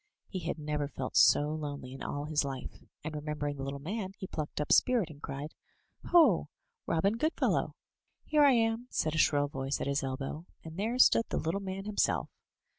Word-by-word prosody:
He 185 - -4
had 170 0 -3
never 150 -1 -2
felt 130 -2 -6
so 145 +1 +6
lonely 145 -4 -5
in 135 - -9
all 145 0 -3
his 150 -1 +1
life, 135 -2 -6 0.2
and 155 +1 -5
remember 150 0 -3
ing 145 - -5
the - - -6
little 140 +1 -4
man, 190 +6 -4
he - - -6
plucked 155 -5 -5
up 150 - -2
spirit, 240 -10 +4
and 145 -1 -14
cried: 140 +2 -6 0.5
"Ho! 345 -2 +5 0.4
Robin 195 +7 +1
Goodfellow!" 315 +7 0 0.5
"Here 300 -1 +4
I 280 -2 +7
am,*' 225 +1 +1
said 155 -2 -1
a 155 - 0
shrill 145 -1 +3
voice 135 0 -3
at - - -2
his 140 0 0
elbow; 135 +5 -4 0.2
and 160 0 -9
there 220 +6 -1
stood 230 -2 +6
the - - -1
little 170 +5 -1
man 195 0 -5
himself. 210 -1 0
155 Hz, 195 wpm, -31 LUFS, 145-200 Hz, 0.5 s, I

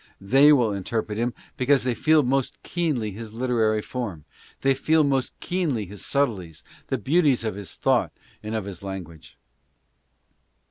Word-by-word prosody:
They 135 +9 +6
will 120 -7 +4
interpret 105 +2 -3
him 120 0 -1 0.2
because 135 +2 +3
they 125 -1 0
feel 155 +4 +4
most 135 +1 -1
keenly 150 -11 -1
his 110 +2 -8
literary 115 -3 +1
form; 105 - -5 0.4
they 135 0 +4
feel 155 +4 +3
most 135 -2 -1
keenly 160 - -1
his 100 +1 -9
subtleties, 100 - -1 0.2
the - - -1
beauties 145 -5 +2
of 110 - -1
his 100 -1 -8
thought - - +1 0.3
and 110 +1 -4
of 110 -3 -2
his 95 -4 -7
language. 90 -5 -8
120 Hz, 150 wpm, -24 LUFS, 105-135 Hz, 0.4 s, They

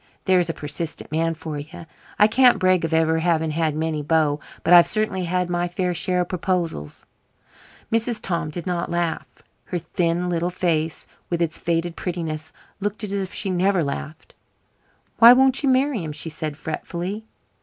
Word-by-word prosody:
There's 180 -3 +3
a - - 0
persistent 150 +2 -5
man 165 +1 0
for 155 -1 -6
you. 165 +4 -10 0.3
I 210 - +7
can't 245 +3 +5
brag 185 -2 +3
of 165 - -1
ever 160 0 +2
having 160 -2 +1
had 160 -1 0
many 155 -1 -1
beaux, 150 -1 +1 0.2
but 175 - +4
I've 175 -1 +9
certainly 215 -4 0
had 180 +1 0
my 175 0 -1
fair 180 +1 -1
share 180 +2 0
of 175 - -3
proposals." 175 - -3 0.9
Mrs. 230 0 0
Tom 170 -4 -2
did 170 +3 -6
not 175 -2 -2
laugh. 170 -1 -3 0.2
Her 180 - -3
thin 175 +1 -1
little 175 0 0
face, 165 -3 -1 0.2
with 170 - -1
its 165 -2 -1
faded 170 0 -1
prettiness, 160 -3 -4 0.3
looked 205 +2 -3
as 200 -1 -2
if 195 -2 -2
she 195 - -2
never 185 0 +2
laughed. 150 +2 -6 0.9
"Why 235 +1 +10
won't 265 +1 +4
you 280 - +2
marry 260 -5 +2
him?" 155 -2 -5
she 165 - -3
said 155 -2 -5
fretfully. 175 +7 -5
170 Hz, 175 wpm, -23 LUFS, 160-185 Hz, 0.9 s, Why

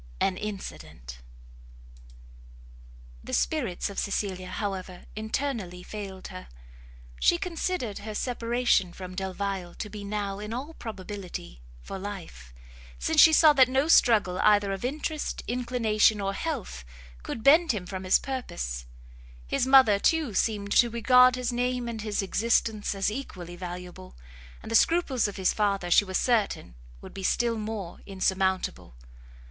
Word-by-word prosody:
AN 190 - +1
INCIDENT. 65 - -7 2.0
The - - -8
spirits 245 - -1
of 200 - -5
Cecilia, 190 -2 -2
however, 190 -2 -5
internally 215 -5 -3
failed 195 -3 -7
her; - - -9 0.7
she 345 - +4
considered 340 - -3
her 215 0 -7
separation 235 -6 +1
from 185 0 -8
Delvile 190 -1 -4
to 210 - -6
be 210 -1 -7
now, 200 -1 -3
in 210 +2 -6
all 285 +6 -6
probability, 190 - -8 0.2
for 195 - -6
life, 180 - -8 0.5
since - - +3
she 320 - +9
saw 310 -1 +7
that 260 -3 +5
no 265 +3 +1
struggle 215 - +4
either 205 -1 +4
of 195 - -6
interest, 300 +4 -3
inclination, 230 -3 +2
or 195 0 -1
health, 225 - -4 0.4
could 220 - -6
bend 315 +3 +6
him 205 -6 -4
from 190 0 -6
his 185 - +5
purpose; 60 - -5 0.6
his 240 - 0
mother, 260 -7 +6
too, 310 -2 +1
seemed 205 0 0
to 240 - +5
regard 250 +2 +5
his 250 -1 -2
name 245 0 -1
and 225 -2 -4
his 210 -2 -2
existence 215 0 0
as 195 +1 0
equally 185 -8 -7
valuable, 175 - -8 0.5
and - - -8
the - - +1
scruples 275 -5 +3
of 205 - -7
his 190 -1 +2
father 200 -4 0
she 205 - +6
was 185 -1 -1
certain 220 - 0 0.3
would - - -11
be 195 - -7
still 235 +4 +1
more 210 -5 -5
insurmountable. 190 - -1
210 Hz, 140 wpm, -27 LUFS, 185-245 Hz, 2.0 s, she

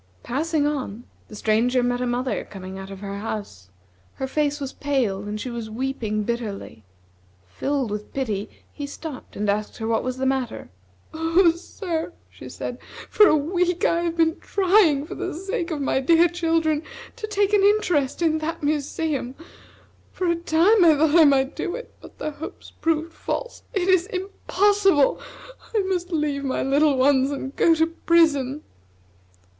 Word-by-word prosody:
Passing 300 +3 0
on, 260 -7 -3 0.2
the 215 - -11
Stranger 235 +4 +2
met 245 0 0
a 250 - 0
mother 250 +2 -1
coming 190 -1 -9
out 195 0 -8
of 195 0 -9
her 200 0 -5
house. 200 - -6 0.5
Her 265 - -3
face 295 +2 0
was 275 -1 -5
pale, 255 -9 -1
and 205 +1 -5
she 250 - -5
was 230 -2 -5
weeping 220 -3 -2
bitterly. 210 - -5 0.6
Filled 260 - -2
with 210 0 -5
pity, 220 -6 -2 0.2
he 285 -1 -5
stopped 285 -1 -8
and 210 +1 -2
asked 210 +1 -1
her 220 - -4
what 225 0 +1
was 255 0 -3
the 265 - -1
matter. 265 - -2 0.4
"Oh, 330 +2 +4
sir," 340 0 -5 0.2
she - - -11
said, - - -6 0.3
"for 425 - +7
a - - +5
week 350 +4 0
I 340 - +2
have 340 -1 -2
been 325 0 +2
trying, 365 -7 +3
for - - -7
the - - -4
sake 355 -1 -3
of 315 -3 -3
my 270 - +1
dear 330 +5 +5
children, 325 -3 0 0.3
to 455 -3 -5
take 410 -1 +1
an 410 - +5
interest 355 -8 +2
in 315 -1 +2
that 315 0 -4
museum. 290 -2 -1 0.8
For 370 - -3
a 340 -1 +2
time 345 +5 +4
I 320 -3 +6
thought 305 0 +3
I 330 -2 +8
might 275 -1 +3
do 355 - -3
it, 485 - -9
but - - -14
the 305 - -3
hopes 295 +2 -9
proved 325 0 -1
false. - - -4
It 380 -2 -1
is 370 -1 +4
impossible. 390 -4 +2 0.5
I 430 - +4
must 365 -1 -2
leave 295 -3 -1
my 265 -1 -1
little 280 +1 +3
ones, 265 0 +4
and 275 -1 -5
go 330 - +4
to 320 0 +3
prison." 315 -4 +2
295 Hz, 170 wpm, -23 LUFS, 250-335 Hz, 0.8 s, I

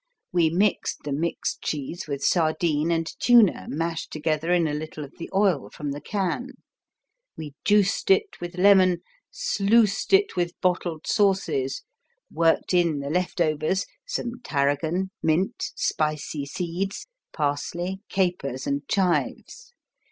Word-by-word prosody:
We 170 -3 +3
mixed 195 +5 0
the 145 - -4
mixed 160 +4 -2
cheese 155 +5 -4
with 140 -1 -4
sardine 160 -1 +2
and 165 -1 +1
tuna 225 - +5
mashed 165 +2 -3
together 155 +2 -1
in 175 -2 +3
a 150 - -2
little 155 0 -5
of 140 - -12
the 165 - -6
oil 190 -7 +2
from 145 -2 -5
the 145 +1 -6
can. 205 - -2 0.8
We 150 -3 -7
juiced 205 - +2
it 400 - +2
with 175 +1 -6
lemon, 185 -2 +5 0.3
sluiced 210 0 +2
it 395 +1 +4
with 175 -1 -2
bottled 175 -3 -1
sauces, 215 - +1 0.5
worked 165 +2 +2
in 170 -4 +3
the 140 0 -4
leftovers, 170 0 0 0.2
some 245 - -3
tarragon, 155 +6 0
mint, 165 +4 0
spicy 150 -2 -1
seeds, 180 +5 -3 0.3
parsley, 170 +6 -2
capers 175 -9 -1
and 140 0 -1
chives. 195 - -1
170 Hz, 130 wpm, -25 LUFS, 155-195 Hz, 0.8 s, tuna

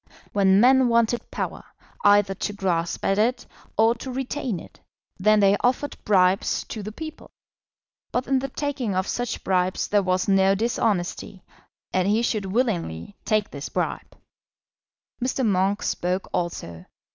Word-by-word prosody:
When 195 -1 +4
men 260 +2 +5
wanted 235 0 +1
power, - - -4 0.4
either 205 -1 +5
to 205 +2 -4
grasp 175 -4 -1
at 195 +1 +2
it 245 +3 +1 0.3
or 225 +1 +5
to 240 +3 -8
retain 255 - -3
it, - - -15 0.4
then 215 +2 +4
they 200 0 +5
offered 255 +4 0
bribes 190 -1 +3
to 220 - -5
the 210 +1 -6
people. 315 +7 -9 0.8
But 250 +1 -1
in 270 -1 +2
the 275 +1 -4
taking 265 -7 -2
of 185 +1 0
such 245 -1 -3
bribes 185 0 0
there 205 -1 +3
was 185 -1 0
no 195 0 +4
dishonesty, 200 -4 -1 0.5
and 185 0 +2
he 215 +3 +2
should 215 -4 -1
willingly 195 - -2
take 215 -2 +1
this 140 0 -6
bribe. - - -3 1.1
Mr. 260 0 0
Monk 195 0 +1
spoke 180 +2 -1
also. 90 - -4
205 Hz, 145 wpm, -24 LUFS, 185-240 Hz, 1.1 s, men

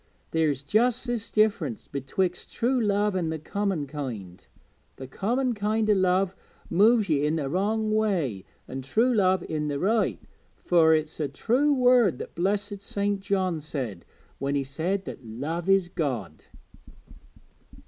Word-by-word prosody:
There's 150 -4 +1
just 235 - +2
this 240 -3 -3
diff'rence 200 - +1
betwixt 175 +7 -2
true 250 +1 +1
love 205 -1 +1
an' 175 -3 0
the 160 - -2
common 190 0 -2
kind 120 - -6 0.5
the 135 - -8
common 240 - -1
kind 215 +1 0
o' - - +6
love 185 0 +2 0.4
moves 215 +4 +4
ye 145 -4 +1
i' 150 - +2
the 155 -3 -1
wrong 215 +7 0
way, 175 - 0 0.2
an' 135 +1 -5
true 225 - +2
love 190 -4 +3
i' 155 - -2
the 145 -1 -2
right; 215 +7 +1 0.4
fur 160 -2 +4
it's 155 0 -3
a 150 - 0
true 250 - +1
word 245 - +4
the - - -5
blessed 200 +3 -2
St. 200 0 -1
John 190 -4 0
said 130 - -5 0.4
when 140 +1 -1
he 140 - +1
said 170 +9 -2
that - - -8
love 150 +11 -4
is 195 -2 +4
God.' 130 - -4
185 Hz, 150 wpm, -26 LUFS, 145-210 Hz, 0.5 s, o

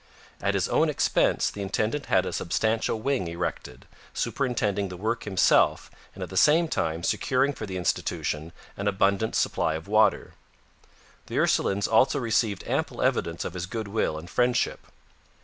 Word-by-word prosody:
At - - 0
his - - +1
own - - +2
expense - - +1
the 100 - -7
intendant 110 +8 -2
had 95 - +3
a - - -4
substantial 110 +5 0
wing 130 -8 0
erected, 85 -7 -5 0.3
superintending 105 -7 -1
the 90 - -8
work 110 +5 -2
himself 95 -3 +3 0.2
and - - -6
at - - -8
the 95 - -4
same 160 - +5
time 80 - -2
securing 130 +8 +1
for 110 - -7
the 95 -1 -4
institution 80 -2 -2 0.2
an 100 - -3
abundant 100 +2 +1
supply 80 - +1
of 80 +3 -7
water. 110 +1 +2 0.9
The - - -4
Ursulines 100 +1 +2
also 130 +6 +3
received 110 -5 0
ample - - -1
evidence 85 0 0
of - - -4
his 90 -1 -4
goodwill 110 -6 -2
and 80 +2 -9
friendship. 125 +6 0
100 Hz, 155 wpm, -26 LUFS, 90-115 Hz, 0.9 s, same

